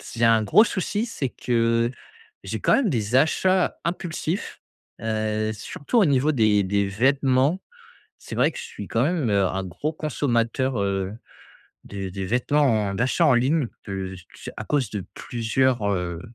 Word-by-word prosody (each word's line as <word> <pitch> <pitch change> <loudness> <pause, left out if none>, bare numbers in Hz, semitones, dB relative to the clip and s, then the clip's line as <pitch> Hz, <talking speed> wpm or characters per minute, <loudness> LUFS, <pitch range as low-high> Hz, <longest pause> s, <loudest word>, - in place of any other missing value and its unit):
c 120 - -10
j'ai - - +4
un 115 -1 +4
gros 210 - +6
souci, 205 +1 -2
c'est 140 - -3
que 115 -1 +1 0.5
j'ai - - -4
quand - - +3
même 250 -8 +2
des 115 -3 0
achats 185 +6 +2
impulsifs, 170 +1 -3 0.4
heu, 110 -1 -1
surtout 145 - -2
au 215 - +6
niveau 140 -1 +3
des 110 -6 +3
des 100 +1 0
vêtements. 135 - +2 0.6
C'est - - -9
vrai - - +3
que - - -10
je - - -6
suis 465 0 -8
quand 115 - +1
même, 155 -5 0
heu, 100 -2 +3
un 95 +1 -3
gros 100 - -4
consommateur, 130 -5 -1
heu, 95 0 -1 0.7
des 95 -2 -6
des 95 0 -4
vêtements 125 -1 +2
en - - -3
d'achat 125 - +1
en 145 - +5
ligne 130 +3 +2 0.2
de 95 -1 -4
s 90 -2 -11
tu - - -15
sais? - - -6
À 105 - -5
cause 135 -5 0
de 105 -3 -4
plusieurs, 120 -2 0
heu, 85 -3 -3
120 Hz, 175 wpm, -24 LUFS, 100-145 Hz, 0.7 s, gros